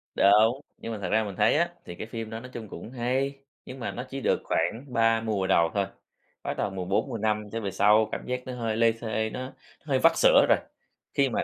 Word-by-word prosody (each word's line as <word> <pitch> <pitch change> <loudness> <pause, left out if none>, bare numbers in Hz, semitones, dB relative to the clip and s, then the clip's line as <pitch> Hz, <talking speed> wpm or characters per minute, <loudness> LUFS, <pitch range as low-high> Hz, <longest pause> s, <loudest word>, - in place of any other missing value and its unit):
Đúng, 110 +6 +5 0.2
nhưng 115 - -6
mà 110 - -4
thật 90 - -3
ra 110 +2 +3
mình 100 -2 -6
thấy 145 - +3
á, 170 +1 +2 0.2
thì 85 - -8
cái 110 - -7
phim 115 -1 -6
đó 110 - -5
nói 125 - -10
chung 110 -3 -7
cũng 95 +7 -9
hay, 130 +3 -1 0.3
nhưng 130 - -9
mà 120 - -3
nó 125 - -5
chỉ 135 0 -5
được - - +1
khoảng 100 +11 -1
3 115 -1 +3
mùa 105 -4 -1
đầu 85 -3 +4
thôi, 100 -1 +1 0.6
bắt - - -3
đầu - - 0
mùa 95 -1 -5
4 95 +8 0
mùa 115 - -3
5 105 0 -1
trở 115 - -3
về 100 -2 -3
sau 105 +1 +4
cảm - - -4
giác 125 0 -2
nó 130 - -5
hơi 115 -3 -2
lê 115 0 +5
thê, 110 -1 -2
nó 130 +3 -6 0.3
hơi 135 -3 +1
vắt 165 +5 +6
sữa - - +6
rồi. - - +6 0.6
Khi - - +3
mà - - 0
115 Hz, 250 wpm, -27 LUFS, 105-125 Hz, 0.6 s, vắt